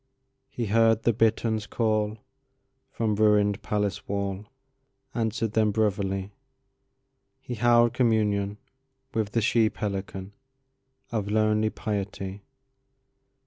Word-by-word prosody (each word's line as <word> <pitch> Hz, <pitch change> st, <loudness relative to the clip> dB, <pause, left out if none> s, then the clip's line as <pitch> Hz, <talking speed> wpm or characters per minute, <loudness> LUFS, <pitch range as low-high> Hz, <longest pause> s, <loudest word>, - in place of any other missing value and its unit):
He 120 Hz, -3 st, -3 dB
heard 115 Hz, +1 st, +3 dB
the 120 Hz, -, +3 dB
bitterns 110 Hz, -1 st, +1 dB
callFrom 110 Hz, -2 st, 0 dB, 0.8 s
ruined 105 Hz, -2 st, +2 dB
palace 105 Hz, -1 st, -2 dB
wall, 100 Hz, 0 st, -3 dB, 0.7 s
Answered 115 Hz, -1 st, -1 dB
them 110 Hz, -1 st, +3 dB
brotherly. 100 Hz, -2 st, -1 dB, 1.1 s
He 125 Hz, -, -7 dB
held 120 Hz, 0 st, +4 dB
communionWith 105 Hz, -5 st, +1 dB, 0.6 s
the 110 Hz, +1 st, 0 dB
she 110 Hz, 0 st, +3 dB
pelicanOf 95 Hz, -2 st, -5 dB, 0.8 s
lonely 110 Hz, 0 st, +1 dB
piety. 100 Hz, -2 st, -4 dB
105 Hz, 85 wpm, -26 LUFS, 100-115 Hz, 1.1 s, held